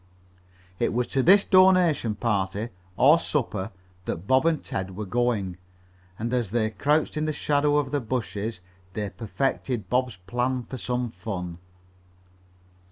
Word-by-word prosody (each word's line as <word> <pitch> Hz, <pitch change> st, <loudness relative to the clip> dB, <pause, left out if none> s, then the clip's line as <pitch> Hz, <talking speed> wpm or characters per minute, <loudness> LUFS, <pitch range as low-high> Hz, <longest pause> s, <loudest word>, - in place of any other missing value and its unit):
It -, -, +1 dB
was 125 Hz, +1 st, +1 dB
to 135 Hz, -, +1 dB
this 195 Hz, +8 st, +6 dB
donation 185 Hz, -, +4 dB
party, 105 Hz, 0 st, -1 dB, 0.3 s
or 145 Hz, +8 st, +6 dB
supper, 110 Hz, -, -2 dB, 0.4 s
that 85 Hz, -, -4 dB
Bob 130 Hz, +7 st, +3 dB
and 160 Hz, -3 st, +1 dB
Ted 95 Hz, -1 st, -4 dB
were 105 Hz, -, -3 dB
going, 100 Hz, -4 st, 0 dB, 0.6 s
and 115 Hz, +3 st, -3 dB
as 120 Hz, -5 st, 0 dB
they 110 Hz, 0 st, 0 dB
crouched 150 Hz, +6 st, +1 dB
in 155 Hz, -, 0 dB
the 155 Hz, -, 0 dB
shadow 145 Hz, 0 st, +1 dB
of 140 Hz, -3 st, 0 dB
the 145 Hz, -, +1 dB
bushes 110 Hz, -4 st, -3 dB, 0.3 s
they 105 Hz, -1 st, -3 dB
perfected 110 Hz, +2 st, -2 dB
Bob's 125 Hz, -3 st, +1 dB
plan 120 Hz, +7 st, -2 dB
for 130 Hz, +1 st, -8 dB
some 125 Hz, -1 st, -2 dB
fun. 90 Hz, -7 st, -5 dB
120 Hz, 145 wpm, -26 LUFS, 105-140 Hz, 0.6 s, this